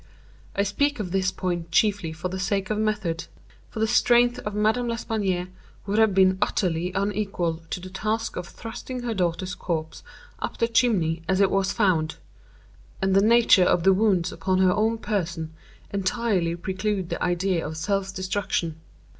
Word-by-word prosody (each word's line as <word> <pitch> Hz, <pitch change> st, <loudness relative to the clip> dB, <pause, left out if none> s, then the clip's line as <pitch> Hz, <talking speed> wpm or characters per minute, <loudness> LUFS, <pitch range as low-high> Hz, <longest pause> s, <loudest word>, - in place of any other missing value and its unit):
I 200 Hz, -, +2 dB
speak 285 Hz, +8 st, 0 dB
of 185 Hz, -4 st, -4 dB
this 190 Hz, 0 st, +1 dB
point 175 Hz, -3 st, -3 dB
chiefly 200 Hz, -2 st, +2 dB
for 160 Hz, +3 st, -4 dB
the 185 Hz, +1 st, -5 dB
sake 195 Hz, +1 st, -1 dB
of 215 Hz, -, 0 dB
method; 210 Hz, -6 st, -1 dB, 0.4 s
for 220 Hz, -, -7 dB
the 220 Hz, -, +3 dB
strength 240 Hz, +1 st, +4 dB
of 210 Hz, -1 st, -5 dB
Madame 220 Hz, +4 st, +1 dB
L'Espanaye 200 Hz, -6 st, -1 dB, 0.4 s
would 210 Hz, +2 st, 0 dB
have 220 Hz, -4 st, +4 dB
been 190 Hz, -1 st, +4 dB
utterly 180 Hz, -3 st, 0 dB
unequal 195 Hz, -4 st, -1 dB
to -, -, -3 dB
the 185 Hz, +1 st, -9 dB
task 215 Hz, +3 st, -2 dB
of 180 Hz, -1 st, -5 dB
thrusting 245 Hz, +4 st, -7 dB
her 235 Hz, -2 st, -1 dB
daughter's 180 Hz, -1 st, -1 dB
corpse 160 Hz, -3 st, -4 dB, 0.4 s
up -, -, -4 dB
the 230 Hz, -, +2 dB
chimney 195 Hz, -9 st, +2 dB
as 190 Hz, 0 st, +2 dB
it 195 Hz, -1 st, +4 dB
was 195 Hz, -1 st, +1 dB
found; 175 Hz, -8 st, +1 dB, 0.8 s
and 190 Hz, -1 st, +1 dB
the 195 Hz, -, +5 dB
nature 230 Hz, -2 st, +5 dB
of 175 Hz, -1 st, +2 dB
the 190 Hz, +1 st, +6 dB
wounds 190 Hz, -3 st, +2 dB
upon 185 Hz, -1 st, -1 dB
her 185 Hz, -1 st, +4 dB
own 220 Hz, +2 st, +1 dB
person 170 Hz, -7 st, -3 dB, 0.4 s
entirely 195 Hz, -4 st, 0 dB
preclude 190 Hz, +1 st, -2 dB
the 170 Hz, -, -3 dB
idea 180 Hz, 0 st, 0 dB
of 160 Hz, -, -5 dB
self 195 Hz, +3 st, -1 dB
destruction. 185 Hz, -4 st, -2 dB
195 Hz, 170 wpm, -25 LUFS, 180-215 Hz, 0.8 s, the